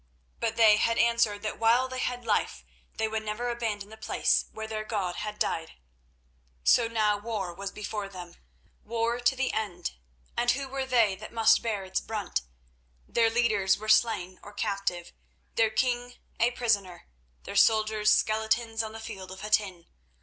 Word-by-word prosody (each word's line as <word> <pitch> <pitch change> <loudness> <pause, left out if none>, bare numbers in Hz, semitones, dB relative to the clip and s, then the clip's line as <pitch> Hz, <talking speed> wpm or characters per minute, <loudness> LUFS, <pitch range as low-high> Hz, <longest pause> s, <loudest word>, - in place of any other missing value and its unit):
But 230 -1 -1
they 220 -2 +6
had 230 +2 +1
answered 230 -3 +2
that 215 - -4
while 235 +3 +4
they 255 0 -5
had 245 -1 -2
life 75 - 0 0.3
they 220 - +1
would 220 0 -2
never 220 +3 -3
abandon 215 -4 -3
the 220 - -12
place - - +1
where 220 - -6
their 220 0 -4
God 195 -5 -2
had 210 0 -4
died. 160 -5 -2 0.9
So 235 -2 +5
now 215 -2 +1
war 205 -5 -4
was 195 +2 -5
before 210 -1 -5
them—war 225 +6 -5
to 245 +2 +2
the 265 0 -1
end; 180 -6 -3 0.4
and 240 - +1
who 270 +2 +1
were 265 0 -3
they 230 -6 +3
that - - -9
must 225 -1 +4
bear 215 -4 -2
its 190 - -1
brunt? 210 - -3 0.7
Their 230 -1 +3
leaders 220 -5 +2
were 215 - -8
slain 215 -5 +2
or 205 - -12
captive, 195 -5 -2 0.4
their 225 -1 +3
king 245 +2 -1 0.2
a 230 +2 +4
prisoner, 205 -7 -1 0.4
their - - -7
soldiers 215 +1 +4
skeletons 220 +1 +1
on 220 -1 -5
the 225 - -7
field 195 -4 -8
of 190 0 -9
Hattin. 205 -5 0
220 Hz, 165 wpm, -28 LUFS, 200-230 Hz, 0.9 s, they